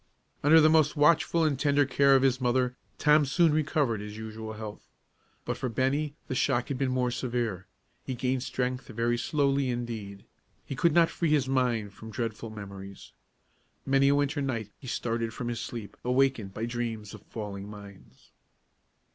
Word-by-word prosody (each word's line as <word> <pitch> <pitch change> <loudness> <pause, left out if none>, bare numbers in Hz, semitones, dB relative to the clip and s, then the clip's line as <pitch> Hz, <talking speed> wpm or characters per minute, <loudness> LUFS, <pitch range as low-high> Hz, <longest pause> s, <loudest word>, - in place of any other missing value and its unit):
Under 155 +3 +7
the 155 - +6
most 155 -1 +4
watchful 165 +2 +4
and 145 -4 +1
tender 145 0 +3
care 140 +1 +4
of 135 - +4
his 130 -1 +2
mother, 125 0 +1 0.2
Tom 150 0 +5
soon 155 +3 +3
recovered 145 -7 +1
his 105 +1 -7
usual 110 0 -6
health. 105 -1 -8 0.6
But - - -2
for 130 - -2
Bennie 140 +5 0
the - - -3
shock 130 -2 +1
had 135 -3 -3
been 135 -2 +1
more 125 -1 0
severe. 115 -7 -2 0.4
He 130 - -4
gained 130 +1 -1
strength 125 0 -2
very 120 0 0
slowly, 140 -1 +1
indeed. 115 -5 -5 0.4
He 135 - -5
could 170 +4 +3
not 165 0 +5
free 170 - -1
his 145 -4 +2
mind 120 -6 0
from 110 +2 -11
dreadful 115 0 -4
memories. 100 - -9 0.7
Many 135 0 +4
a 140 - +4
winter 145 +1 0
night 115 -6 -3
he 130 - -11
started 115 -1 -2
from 120 - -4
his 120 -1 -3
sleep, 115 -4 -6
awakened 125 -5 +1
by 110 +4 -3
dreams 115 -3 -4
of - - -10
falling 100 -2 -7
mines. 100 -2 -13
125 Hz, 170 wpm, -28 LUFS, 110-140 Hz, 0.7 s, Under